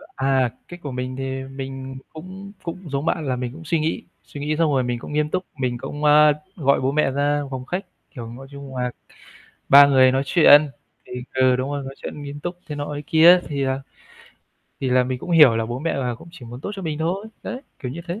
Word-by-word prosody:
À, 135 -2 +2 0.2
cách 175 0 -10
của 140 - -4
mình 125 0 -4
thì 135 0 -4
mình 135 0 -7 0.2
cũng 190 +5 -9
cũng 170 -1 -7
giống 140 +3 -2
bạn 165 -3 0
là 130 - 0
mình 125 -1 -4
cũng 165 +2 -11
suy 165 0 +1
nghĩ, 155 +1 -2 0.2
suy 145 - -9
nghĩ 150 +1 -1
xong 165 -3 +2
rồi 130 -2 +2
mình 120 -1 -2
cũng 145 - -8
nghiêm 150 0 +1
túc. 185 +2 -2
Mình 125 -2 -1
cũng, 145 +4 -7
a, 150 0 +7 0.2
gọi 140 -6 +2
bố 135 +1 +1
mẹ 150 -2 +2
ra 145 +1 +1
phòng 130 -1 -5
khách, 180 +7 -3 0.3
kiểu, 115 -2 -6
nói 130 +4 -10
chung 140 -2 -9
là, 125 0 -1 0.8
ba 140 +1 +10
người 130 -2 +5
nói 135 +1 +1
chuyện 150 -1 +6 0.4
thì - - -15 0.2
ừ, 130 -1 +4
đúng 130 +2 -2
rồi. 140 -1 -3
Nói 135 0 -7
chuyện 145 - -7
nghiêm 145 0 -7
túc 175 +3 -5
thế 150 - -5
nọ 145 0 -4
thế 145 - -4
kia, 170 +3 +7
thì 140 -2 -2
à 130 +1 -1 1.0
thì 130 - -1
là 125 0 +4
mình 130 0 -3
cũng 175 - -8
hiểu 150 -9 +7
là 115 0 -1
bố 120 +1 -4
mẹ 165 +4 -1
là 125 -3 -1
cũng 115 - -14
chỉ 135 -8 -12
muốn 120 +2 -9
tốt 200 - -5
cho 195 - -7
mình 155 -2 -3
thôi. 185 +6 -2 0.2
Đấy, 255 - -5 0.2
kiểu 125 -2 -5
như 170 - -6
thế. 175 +6 -4
140 Hz, 245 wpm, -22 LUFS, 130-155 Hz, 1.0 s, ba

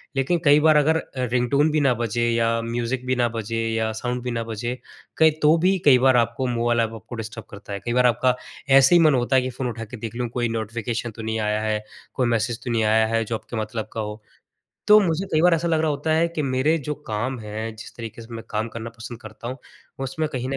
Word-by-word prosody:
लेकिन 150 +6 +1
कई 145 +1 +7
बार 155 0 +5
अगर 160 +2 +3
अ, - - -2 0.2
रिंगटोन 125 +4 +1
भी 155 - +2
ना 135 -3 +4
बजे 120 +1 0
या 115 0 +2
म्यूज़िक 120 +2 -3
भी 130 - +2
ना 120 -1 +2
बजे 115 0 -4
या 110 0 0
साउंड 125 0 -2
भी 125 - -3
ना 115 -1 -2
बजे, 115 +2 -4 0.4
कहीं 160 -1 +6
तो 155 +2 +5
भी 185 +3 +2
कई 130 -3 +8
बार 130 -1 +5
आपको 120 +2 0
मोबाइल 120 0 +1
अप 115 0 -3
आपको 115 +2 -9
डिस्टर्ब 115 0 -7
करता 100 0 -9
है। 100 - -4
कई 120 - -1
बार 125 0 +3
आपका 125 +2 +2 0.3
ऐसे 135 +4 +7
ही 170 - +6
मन 155 -3 +5
होता 125 +2 +1
है 130 - +5
कि 130 - -3
फ़ोन 125 0 -4
उठा 115 -1 -6
के 120 +3 -9
देख 115 +1 -6
लूँ 120 -1 -2
कोई 120 -2 0
नोटिफ़िकेशन 115 +1 -3
तो 110 - -10
नहीं 110 0 -2
आया 105 0 0
है, 110 -1 -1 0.3
कोई 125 -3 0
मैसेज 115 0 -1
तो 120 - -3
नहीं 115 -1 +1
आया 110 +1 +3
है 115 - +2
जो 115 +1 -2
आपके 115 - -8
मतलब 110 0 -4
का 110 - -2
हो। 105 +1 -6 0.7
तो 210 0 +9
मुझे 185 0 0
कई 155 - +3
बार 175 -1 +6
ऐसा 170 +1 -1
लग 160 -1 +2
रहा 160 -1 +1
होता 150 +2 -1
है 165 +1 +3
कि 165 -2 -3
मेरे 135 +4 +1
जो 150 - -1
काम 120 +4 -2
हैं 110 +1 -5
जिस 110 - -11
तरीके 115 0 -8
से 115 +1 -11
मैं 115 - -6
काम 110 +2 -1
करना 115 0 -7
पसंद 115 +1 -9
करता 110 +1 -9
हूँ, 130 - -5 0.5
उसमें 155 +4 -2
कहीं 130 0 -3
न 135 - -1
120 Hz, 255 wpm, -23 LUFS, 115-135 Hz, 0.7 s, तो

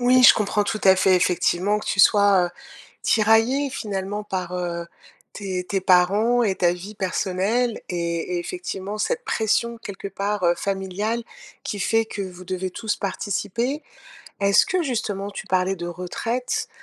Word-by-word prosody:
Oui, 250 +1 +5
je - - +10
comprends 210 0 0
tout 215 +1 -2
à 190 - +8
fait, 190 0 +4
effectivement, 180 +3 +1
que - - -10
tu - - -1
sois, 200 -2 +6
heu, - - -7 0.5
tiraillée, 225 +6 +3
finalement, 205 -3 -4
par, 185 -4 -4
heu, 170 -1 -3 0.5
tes 190 -3 -4
tes 195 +1 -1
parents 200 +7 +3
et 195 -3 +1
ta 175 -1 +3
vie 185 +4 -8
personnelle, 200 +5 -1
et 170 0 -2
et - - 0
effectivement, 205 - -5
cette 485 - -1
pression, 235 +1 0
quelque 200 -2 -7
part, 200 0 -2
heu, 170 0 +4
familiale, 200 +5 -2 0.4
qui 205 - -4
fait 225 +4 +2
que 210 -2 -5
vous 185 -1 -8
devez 185 0 -3
tous 215 +3 -2
participer. 210 +8 -2 0.6
Est-ce 200 0 +5
que, 370 -2 0
justement, 205 -6 -2
tu - - -7
parlais 185 +1 +1
de 175 -1 -5
retraite, 205 +8 -3
200 Hz, 160 wpm, -23 LUFS, 185-220 Hz, 0.6 s, je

